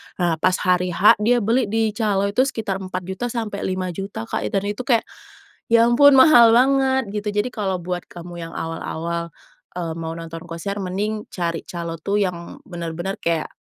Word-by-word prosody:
Nah, 170 -3 0
pas 185 +3 +3
hari 180 -1 +1
H, 210 - +6
dia 235 +2 +2
beli 230 +3 +2
di 220 +1 +1
calo, 210 -3 0
itu 255 +6 +2
sekitar 210 -7 -3
Rp4.000.000-Rp5.000.000, 190 - -4
Kak, 110 - -3
dan 195 - -1
itu 210 +6 -4
kayak, 235 -4 +3 0.6
ya 230 0 +5
ampun, 270 +4 +6
mahal 250 -5 +7
banget, 265 -2 +3
gitu. 210 0 -4 0.2
Jadi 250 - -5
kalau 200 -5 -2
buat 180 0 -4
kamu 175 0 -9
yang 165 0 -7
awal-awal, 170 +1 -4 0.4
eee, 170 -2 -3
mau 165 0 -4
nonton 165 0 -7
konser, 190 +5 -5
mending 205 +3 -3
cari 170 -2 -4
calo 170 -2 -5
itu 200 +5 0
yang 175 -2 -6
bener-bener 175 +1 -5
kayak, 165 -2 -1
195 Hz, 165 wpm, -21 LUFS, 170-225 Hz, 0.6 s, mahal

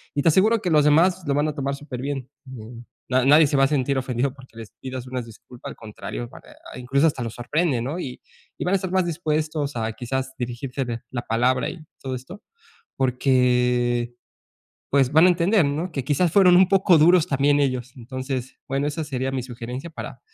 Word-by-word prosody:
y 145 - +1
te - - +5
aseguro 215 +8 +4
que 180 - -1
los 150 -2 +5
demás 170 +5 +4
lo 140 - +1
van 145 +1 +1
a - - -4
tomar 140 -1 -2
súper 140 -3 -8
bien. 135 -2 -4 0.2
En, 120 -1 -10 0.2
na 130 0 +2
nadie 150 +2 +6
se 140 - 0
va 135 - +5
a - - +3
sentir 140 0 0
ofendido 130 0 -1
porque 130 -4 -17
les 115 -2 -9
pidas 130 -1 -6
una 125 0 -3
disculpa, 115 +2 -12
al - - -9
contrario, 105 - -7
eh, - - -14 0.2
a, - - -9
incluso 135 +5 +2
hasta 135 -6 -2
los 115 - -5
sorprende, 140 +1 0
¿no? 145 +9 -3
Y 125 -6 -6 0.4
y - - -3
van 180 - +1
a - - +5
estar 185 -1 -4
más 185 -1 +2
dispuestos 155 -3 -2
a 110 0 -2
quizás 130 +2 -4
dirigirte 120 -1 -4
la 120 -1 -4
palabra 125 +3 +1
y - - -8 0.2
todo 130 -1 -4
esto, 130 +11 -10 0.6
porqué, 125 -2 +1 0.8
pues 135 -1 +3
van 160 +3 +6
a - - +7
entender, 180 +1 +3
¿no?, 155 +6 -2
que 135 -4 -3
quizás 150 +6 +1
fueron 185 -2 +6
un 185 0 +6
poco 190 -3 +5
duros 170 +2 +5
también 145 0 +2
ellos. 130 -2 -1
Entonces, 130 +1 -5
bueno, 140 +2 -1
esa 160 +2 -3
sería 135 -3 -3
mi 130 -2 -3
sugerencia 125 +5 -7
para, 165 - -8
135 Hz, 205 wpm, -23 LUFS, 125-155 Hz, 0.8 s, a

